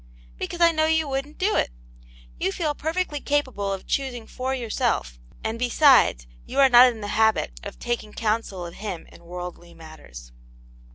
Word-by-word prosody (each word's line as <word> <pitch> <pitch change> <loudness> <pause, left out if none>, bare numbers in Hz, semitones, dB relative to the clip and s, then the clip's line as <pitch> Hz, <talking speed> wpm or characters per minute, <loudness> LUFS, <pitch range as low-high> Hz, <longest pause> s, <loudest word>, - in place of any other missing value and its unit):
"Because 345 - -4
I 335 0 +7
know 315 -1 +1
you 320 -1 +2
wouldn*t 275 +2 -3
do 425 - +2
it. - - +1 0.7
You - - 0
feel 305 - -1
perfectly 320 -1 -2
capable 260 -9 -1
of 195 -1 -5
choosing 255 -4 -2
for 260 +3 -3
yourself, 215 - -1 0.2
and 220 +1 -3
be 250 0 0
sides, 255 - +5 0.2
you - - -8
are 270 -1 +7
not 245 0 +8
in 225 -2 -10
the 205 - -5
habit 220 - +1
of - - -8
taking 240 -3 -3
counsel 210 -5 -2
of 170 - -8
Him 195 -4 -6
in - - -16
worldly 175 0 -8
matters." 65 - -12
230 Hz, 175 wpm, -24 LUFS, 180-280 Hz, 0.7 s, not